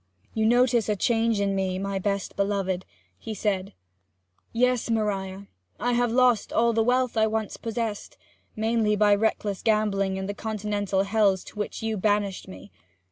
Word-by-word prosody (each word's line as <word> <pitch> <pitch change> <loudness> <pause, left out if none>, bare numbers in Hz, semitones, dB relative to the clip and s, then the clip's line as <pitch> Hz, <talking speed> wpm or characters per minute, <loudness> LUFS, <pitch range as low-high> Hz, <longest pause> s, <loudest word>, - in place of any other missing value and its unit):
'You 220 0 +1
notice 240 -2 +3
a 210 - +2
change 225 +1 +1
in 200 -1 +1
me, 190 -1 -1
my 195 0 -2
best 200 0 -2
beloved,' 195 -2 -1 0.3
he 220 - -6
said. 195 -2 -2 0.8
'Yes, 250 0 +1
Maria 200 -3 -2 0.3
I 245 - 0
have 240 -1 +1
lost 245 -2 +3
all 235 0 +2
the 225 - +2
wealth 250 +1 +1
I 220 -1 +3
once 220 -1 -2
possessed 225 -2 -4 0.4
mainly 220 -1 +1
by 210 0 +4
reckless 205 -1 0
gambling 200 -3 +1
in 190 - -3
the 205 - -3
Continental 205 -2 -1
hells 200 -2 +2
to 210 - -11
which 210 - -4
you 220 -1 -1
banished 205 -1 0
me. 190 +1 -11
210 Hz, 160 wpm, -26 LUFS, 200-225 Hz, 0.8 s, by